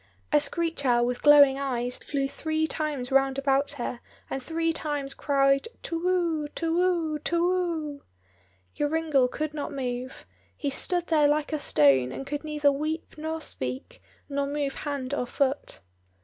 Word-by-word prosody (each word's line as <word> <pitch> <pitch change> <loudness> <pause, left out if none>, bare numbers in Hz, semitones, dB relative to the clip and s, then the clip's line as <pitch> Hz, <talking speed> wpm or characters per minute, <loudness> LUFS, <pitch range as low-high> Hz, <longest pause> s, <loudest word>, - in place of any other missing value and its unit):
A 300 - +6
screech 330 0 -2
owl 240 -2 +3
with 245 0 -2
glowing 285 -2 +7
eyes 250 -3 -2
flew 275 -2 -2
three 315 +2 -1
times 295 -5 -3
round 270 0 +3
about 275 +1 +1
her, 240 0 -4 0.3
and 270 - -2
three 330 +4 -1
times 290 -3 -3
cried, 275 +3 +2 0.2
"to 330 0 -3
whoo, 340 -4 +1
to 330 0 -1
whoo, 340 -4 +1
to 335 +3 0
whoo!" 330 -6 -1 0.7
Joringel 295 -3 +2
could 305 +3 -3
not 295 -2 -4
move: 255 -1 -4 0.3
he 285 -3 -2
stood 350 +5 0
there 305 -3 +4
like 300 +1 0
a 305 - 0
stone, 135 - +4
and 270 - -6
could 290 +2 -4
neither 300 -2 +2
weep 310 +3 -3
nor 315 +1 -4
speak, 130 - -5 0.3
nor 280 -1 -1
move 285 -1 -2
hand 280 -2 -4
or 250 -3 -1
foot. 275 +2 -1
290 Hz, 160 wpm, -27 LUFS, 270-315 Hz, 0.7 s, glowing